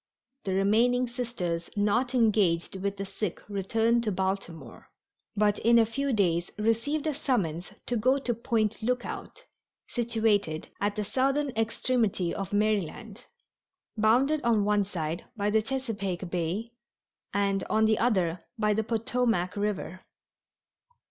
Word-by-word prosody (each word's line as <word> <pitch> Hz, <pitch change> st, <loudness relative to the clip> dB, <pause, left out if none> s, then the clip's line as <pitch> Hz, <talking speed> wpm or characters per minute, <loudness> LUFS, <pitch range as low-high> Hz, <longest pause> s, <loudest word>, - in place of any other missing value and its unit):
The 190 Hz, -, -1 dB
remaining 235 Hz, +6 st, +3 dB
Sisters 230 Hz, -9 st, -3 dB
not 235 Hz, +5 st, +1 dB
engaged 205 Hz, -8 st, +2 dB
with 200 Hz, 0 st, -2 dB
the 195 Hz, -, -3 dB
sick 190 Hz, -1 st, -4 dB
returned 225 Hz, +4 st, +1 dB
to 215 Hz, -, 0 dB
Baltimore, 190 Hz, -8 st, -4 dB, 0.5 s
but 205 Hz, 0 st, +2 dB
in 235 Hz, +1 st, +5 dB
a 230 Hz, -, +6 dB
few 275 Hz, +5 st, -2 dB
days 175 Hz, -6 st, +1 dB
received 230 Hz, +8 st, 0 dB
a 310 Hz, -, +1 dB
summons 190 Hz, -, -1 dB
to 245 Hz, -, -1 dB
go 255 Hz, +5 st, +3 dB
to 260 Hz, -3 st, -1 dB
Point 225 Hz, -2 st, -1 dB
Lookout, 250 Hz, -, -3 dB, 0.4 s
situated 220 Hz, -8 st, 0 dB
at 205 Hz, 0 st, 0 dB
the 210 Hz, -, -1 dB
southern 270 Hz, +7 st, +1 dB
extremity 225 Hz, -5 st, 0 dB
of 195 Hz, -2 st, -4 dB
Maryland, 210 Hz, +2 st, -1 dB, 0.7 s
bounded 250 Hz, +8 st, +3 dB
on 225 Hz, -4 st, +3 dB
one 205 Hz, -1 st, +2 dB
side 170 Hz, -3 st, -4 dB
by 205 Hz, 0 st, 0 dB
the 220 Hz, +1 st, +4 dB
Chesapeake 205 Hz, -8 st, -3 dB
Bay 180 Hz, +7 st, -2 dB, 0.6 s
and 200 Hz, -1 st, +1 dB
on 220 Hz, 0 st, +2 dB
the 220 Hz, 0 st, +3 dB
other 185 Hz, -8 st, +1 dB, 0.2 s
by 210 Hz, -1 st, +2 dB
the 220 Hz, +1 st, 0 dB
Potomac 225 Hz, -4 st, 0 dB
River. 205 Hz, -3 st, -2 dB
215 Hz, 135 wpm, -28 LUFS, 195-235 Hz, 0.7 s, a